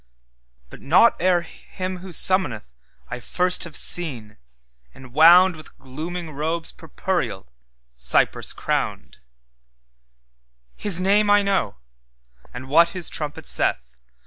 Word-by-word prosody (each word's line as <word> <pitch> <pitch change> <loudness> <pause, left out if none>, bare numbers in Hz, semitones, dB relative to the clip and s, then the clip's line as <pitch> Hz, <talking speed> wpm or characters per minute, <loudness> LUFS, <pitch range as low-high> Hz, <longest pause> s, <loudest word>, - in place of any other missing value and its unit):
But - - -13
not 180 +11 +4
ere 180 0 +2
him 185 +1 -8
who 185 +2 -11
summonethI 120 - -2
first 180 +7 +2
have 170 - -11
seen, 125 -12 0 0.6
enwoundWith 160 +5 +3
glooming 160 +5 -7
robes 160 +3 -4
purpureal, 160 - -4 0.5
cypress 65 +1 0
crowned; - - -4 1.6
His 195 -4 +3
name 205 +3 +2
I 205 0 +4
know, 195 - -1 0.8
and 125 +2 -9
what 165 +5 +4
his 175 - -3
trumpet 150 -1 -5
saith. 60 -1 -2
165 Hz, 100 wpm, -21 LUFS, 125-185 Hz, 1.6 s, not